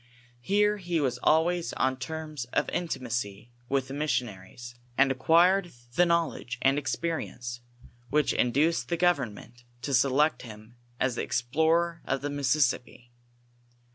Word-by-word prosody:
Here 210 Hz, +9 st, +2 dB
he 175 Hz, -4 st, -2 dB
was 125 Hz, -4 st, -1 dB
always 165 Hz, +5 st, +2 dB
on 130 Hz, 0 st, +1 dB
terms 155 Hz, 0 st, -5 dB
of -, -, +2 dB
inti 175 Hz, -2 st, -2 dB
macy 115 Hz, -3 st, -4 dB, 0.2 s
with 135 Hz, -1 st, 0 dB
the 135 Hz, -, -7 dB
missionaries, 120 Hz, -5 st, -3 dB, 0.2 s
and 135 Hz, 0 st, +4 dB
acquired 175 Hz, +7 st, +3 dB, 0.2 s
the 175 Hz, +6 st, +4 dB
knowledge 165 Hz, -7 st, -1 dB
and 135 Hz, +2 st, +4 dB
experience 130 Hz, -4 st, -4 dB, 0.5 s
which 150 Hz, +1 st, +2 dB
induced 130 Hz, 0 st, +1 dB
the 170 Hz, -, 0 dB
government 125 Hz, -, -1 dB, 0.2 s
to 140 Hz, -, -2 dB
select 140 Hz, +4 st, +3 dB
him 110 Hz, 0 st, -12 dB, 0.2 s
as 125 Hz, -2 st, 0 dB
the -, -, 0 dB
explorer 160 Hz, +7 st, +1 dB
of 135 Hz, -1 st, -1 dB
the 145 Hz, +1 st, -3 dB
Mississippi. 130 Hz, -3 st, 0 dB
140 Hz, 135 wpm, -28 LUFS, 120-165 Hz, 0.5 s, and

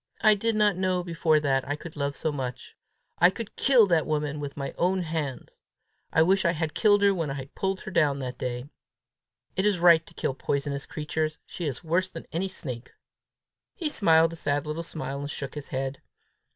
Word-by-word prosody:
I 215 Hz, -1 st, +7 dB
did 225 Hz, +2 st, 0 dB
not 210 Hz, -2 st, +3 dB
know 185 Hz, -1 st, 0 dB
before 165 Hz, -2 st, +2 dB
that 135 Hz, -3 st, +1 dB
I 145 Hz, -, -1 dB
could 160 Hz, +2 st, -10 dB
love 140 Hz, -1 st, -2 dB
so 155 Hz, -, -1 dB
much! 130 Hz, -4 st, -5 dB, 0.4 s
I 175 Hz, -, +7 dB
could 210 Hz, +3 st, -7 dB
kill 255 Hz, -5 st, +5 dB
that 170 Hz, -5 st, +2 dB
woman 150 Hz, -1 st, -1 dB
with 145 Hz, 0 st, -6 dB
my 140 Hz, -1 st, -4 dB
own 185 Hz, +1 st, +1 dB
hands! 155 Hz, -5 st, -4 dB, 0.5 s
I 160 Hz, -, +5 dB
wish 190 Hz, +3 st, +3 dB
I 170 Hz, -2 st, +3 dB
had 160 Hz, -1 st, -2 dB
killed 205 Hz, -2 st, +4 dB
her 200 Hz, -1 st, +5 dB
when 165 Hz, -5 st, -2 dB
I 135 Hz, 0 st, -6 dB
pulled 190 Hz, 0 st, -2 dB
her 200 Hz, -, -7 dB
down 150 Hz, -6 st, +3 dB
that 130 Hz, -2 st, -5 dB
day! 125 Hz, 0 st, -3 dB, 0.9 s
It 190 Hz, -, +1 dB
is 205 Hz, -2 st, +3 dB
right 170 Hz, -2 st, +6 dB
to -, -, -16 dB
kill -, -, -1 dB
poisonous 140 Hz, +1 st, -2 dB
creatures: 155 Hz, +1 st, -2 dB
she 175 Hz, -, -6 dB
is 135 Hz, -1 st, -3 dB
worse 170 Hz, +3 st, +1 dB
than 165 Hz, -, -9 dB
any 185 Hz, +4 st, -1 dB
snake!" 125 Hz, -9 st, -6 dB, 0.8 s
He 325 Hz, -4 st, -2 dB
smiled 165 Hz, -, +4 dB
a -, -, -8 dB
sad 145 Hz, -1 st, -1 dB
little 155 Hz, +2 st, -3 dB
smile, 155 Hz, -4 st, -5 dB
and 145 Hz, 0 st, -5 dB
shook 140 Hz, -3 st, -4 dB
his 150 Hz, -2 st, -7 dB
head. 135 Hz, +1 st, -3 dB
160 Hz, 205 wpm, -27 LUFS, 140-185 Hz, 0.9 s, I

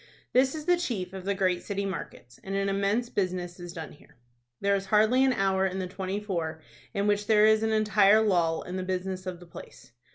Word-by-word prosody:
This 265 Hz, +3 st, +3 dB
is 305 Hz, -1 st, -6 dB
the 355 Hz, 0 st, +4 dB
chief 205 Hz, -, -3 dB
of 190 Hz, -1 st, -7 dB
the 200 Hz, 0 st, 0 dB
great 185 Hz, -2 st, +1 dB
city 200 Hz, -1 st, -3 dB
markets, 130 Hz, -10 st, -7 dB
and 195 Hz, 0 st, -4 dB
an 195 Hz, 0 st, 0 dB
immense 200 Hz, +5 st, 0 dB
business 180 Hz, -4 st, -3 dB
is 175 Hz, 0 st, -7 dB
done 160 Hz, -2 st, -7 dB
here. -, -, -19 dB, 0.4 s
There 200 Hz, 0 st, +2 dB
is 195 Hz, 0 st, -3 dB
hardly 220 Hz, +6 st, +4 dB
an 265 Hz, -, +4 dB
hour 190 Hz, -4 st, +1 dB
in 190 Hz, 0 st, -4 dB
the 190 Hz, -, -2 dB
twenty 190 Hz, +2 st, -4 dB
four 170 Hz, -6 st, -3 dB, 0.3 s
in 200 Hz, 0 st, -1 dB
which 205 Hz, 0 st, +1 dB
there 215 Hz, -1 st, +5 dB
is 220 Hz, 0 st, +4 dB
an 220 Hz, 0 st, 0 dB
entire 215 Hz, -1 st, +4 dB
lull 170 Hz, -6 st, +1 dB
in 180 Hz, +1 st, -6 dB
the -, -, -2 dB
business 185 Hz, 0 st, -3 dB
of 180 Hz, -2 st, -5 dB
the 175 Hz, -, -13 dB
place. 170 Hz, -, -13 dB
195 Hz, 225 wpm, -28 LUFS, 185-210 Hz, 0.4 s, there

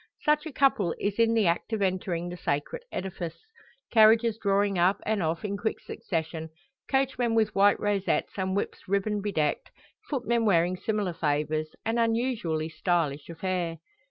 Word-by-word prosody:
Such 300 Hz, +1 st, +2 dB
a -, -, -6 dB
couple 265 Hz, -, +2 dB
is 205 Hz, +2 st, -2 dB
in 230 Hz, 0 st, +4 dB
the 220 Hz, -3 st, +3 dB
act 170 Hz, +6 st, 0 dB
of 210 Hz, -2 st, 0 dB
entering 185 Hz, -2 st, -1 dB
the 175 Hz, -, -6 dB
sacred 155 Hz, -, -2 dB
edifice; 180 Hz, -3 st, -5 dB, 0.5 s
carriages 225 Hz, 0 st, +5 dB
drawing 200 Hz, -1 st, +2 dB
up 180 Hz, +3 st, +3 dB
and 215 Hz, -2 st, 0 dB
off 165 Hz, +3 st, -1 dB
in 200 Hz, -1 st, -2 dB
quick 220 Hz, +2 st, -2 dB
succession, 160 Hz, -2 st, -4 dB, 0.4 s
coachmen 260 Hz, -4 st, +1 dB
with 220 Hz, -1 st, +2 dB
white 200 Hz, +1 st, +4 dB
rosettes 205 Hz, -2 st, 0 dB
and 190 Hz, -1 st, -1 dB
whips 200 Hz, -, -3 dB
ribbon 200 Hz, +2 st, 0 dB
bedecked, 160 Hz, -8 st, -1 dB, 0.4 s
footmen 235 Hz, -4 st, 0 dB
wearing 180 Hz, -3 st, +3 dB
similar 205 Hz, -1 st, -2 dB
favours 155 Hz, 0 st, -1 dB
an 225 Hz, +1 st, 0 dB
unusually 225 Hz, -9 st, 0 dB
stylish 160 Hz, -3 st, -1 dB
affair. 170 Hz, -1 st, -2 dB
195 Hz, 155 wpm, -27 LUFS, 170-225 Hz, 0.5 s, carriages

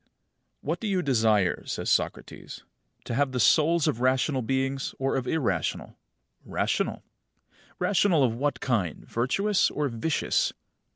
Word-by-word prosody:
39. -, -, -43 dB, 0.5 s
What 160 Hz, +5 st, -2 dB
do 225 Hz, -, -4 dB
you 190 Hz, -3 st, 0 dB
desire? 110 Hz, -8 st, +2 dB
says -, -, -2 dB
Socrates. -, -, -2 dB, 0.4 s
To -, -, -4 dB
have 135 Hz, +1 st, 0 dB
the 125 Hz, -, -1 dB
souls 155 Hz, +7 st, +4 dB
of 120 Hz, -, -1 dB
rational 130 Hz, +2 st, +1 dB
beings 135 Hz, +3 st, -2 dB
or 135 Hz, 0 st, -1 dB
of 130 Hz, -2 st, -2 dB
irrational? 115 Hz, -, -1 dB, 0.5 s
Rational. -, -, -2 dB, 0.7 s
Rational 185 Hz, -6 st, +2 dB
of 120 Hz, -3 st, +2 dB
what 130 Hz, +2 st, -1 dB
kind, 105 Hz, -, -1 dB
virtuous 190 Hz, -, +1 dB
or 150 Hz, -1 st, -2 dB
vicious? 125 Hz, +7 st, 0 dB
135 Hz, 135 wpm, -27 LUFS, 120-155 Hz, 0.7 s, souls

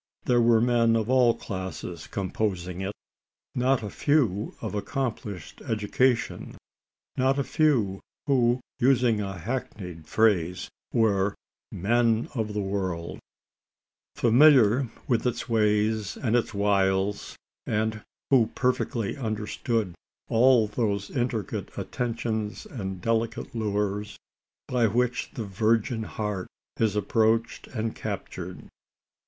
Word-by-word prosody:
There 120 Hz, -1 st, +4 dB
were 115 Hz, -1 st, +5 dB
men 115 Hz, -1 st, +3 dB
of 115 Hz, +2 st, 0 dB
all 125 Hz, -3 st, +5 dB
classes 95 Hz, -4 st, -6 dB
composing 95 Hz, -2 st, -2 dB
it 95 Hz, +1 st, -2 dB, 0.6 s
not 125 Hz, -1 st, +2 dB
a 105 Hz, -, -4 dB
few 120 Hz, -9 st, +1 dB
of 110 Hz, -4 st, -5 dB
accomplished 105 Hz, -, -4 dB
education 115 Hz, +3 st, 0 dB, 0.6 s
not 130 Hz, +1 st, +2 dB
a 140 Hz, -, +1 dB
few 120 Hz, -12 st, +2 dB, 0.3 s
who, 125 Hz, -3 st, +3 dB, 0.2 s
using 120 Hz, -4 st, +3 dB
a 95 Hz, -2 st, -4 dB
hackneyed 90 Hz, -6 st, -5 dB
phrase, 90 Hz, -5 st, +2 dB, 0.2 s
were 100 Hz, -3 st, +2 dB, 0.4 s
"men 115 Hz, +3 st, +1 dB
of 110 Hz, -4 st, -2 dB
the 105 Hz, -, 0 dB
world," 95 Hz, -4 st, -3 dB, 1.0 s
familiar 125 Hz, -1 st, +5 dB, 0.2 s
with 120 Hz, 0 st, +1 dB
its 120 Hz, -1 st, -2 dB
ways 105 Hz, -2 st, +1 dB
and 120 Hz, -3 st, 0 dB
its 120 Hz, -, +1 dB
wiles 100 Hz, -1 st, +1 dB, 0.3 s
and 110 Hz, 0 st, 0 dB, 0.3 s
who 125 Hz, -5 st, +5 dB
perfectly 125 Hz, -4 st, 0 dB
understood 110 Hz, -3 st, -2 dB, 0.4 s
all 120 Hz, 0 st, +5 dB
those 105 Hz, -2 st, -2 dB
intricate 120 Hz, -6 st, -2 dB
attentions 110 Hz, -4 st, -3 dB
and 95 Hz, -7 st, -6 dB
delicate 115 Hz, +2 st, -1 dB
lures, 105 Hz, -2 st, -2 dB, 0.5 s
by 120 Hz, -2 st, +2 dB
which 125 Hz, +3 st, 0 dB
the 115 Hz, -, -3 dB
virgin 110 Hz, +3 st, +1 dB
heart 105 Hz, -3 st, -3 dB, 0.3 s
is 110 Hz, -2 st, +2 dB
approached 110 Hz, +2 st, +1 dB
and 110 Hz, -2 st, -3 dB
captured. 95 Hz, -3 st, -6 dB
110 Hz, 110 wpm, -27 LUFS, 100-120 Hz, 1.0 s, were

